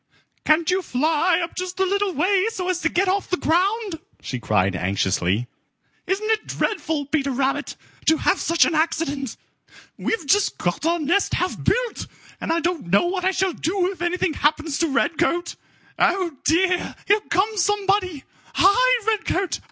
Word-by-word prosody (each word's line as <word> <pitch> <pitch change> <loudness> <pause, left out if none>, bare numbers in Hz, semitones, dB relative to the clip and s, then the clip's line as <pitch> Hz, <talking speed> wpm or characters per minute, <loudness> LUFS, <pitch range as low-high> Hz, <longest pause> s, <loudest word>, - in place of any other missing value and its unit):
"Can't 315 +2 +3
you 370 +1 +1
fly 325 +4 +1
up 335 - -6
just 365 0 -5
a 380 - +3
little 400 +1 0
way 375 +6 +2
so 370 -5 -4
as 360 -1 -1
to 320 - +1
get 375 +4 +1
off 385 +2 0
the 365 - 0
ground?" 375 +3 0 0.2
she 130 - -5
cried 100 -4 +1
anxiously. 95 +3 0 0.6
"Isn't 410 +4 0
it 435 -1 -1
dreadful, 320 -8 -2
Peter 280 -1 -1
Rabbit, 270 +1 -1 0.3
to 320 - +5
have 375 +4 +1
such 335 0 +3
an - - 0
accident? 305 -5 -1 0.6
We've 450 -8 -2
just 405 +7 +2
got 175 - -1
our 340 +1 +2
nest 340 +5 +1
half 365 - -2
built, - - 0 0.3
and - - -2
I 335 +1 +1
don't 340 - -2
know 200 - +3
what 365 +1 -2
I - - +4
shall 380 -1 0
do 365 +3 -1
if 375 - -11
anything 350 -1 0
happens 305 0 0
to 335 - +2
Redcoat. 335 +4 0 0.4
Oh, 355 -4 +1
dear, 360 +2 +1
here 415 +2 +4
comes 405 +3 +1
somebody! 390 -7 0 0.3
Hide, - - +4
Redcoat! 415 -4 0
350 Hz, 165 wpm, -22 LUFS, 310-385 Hz, 0.6 s, to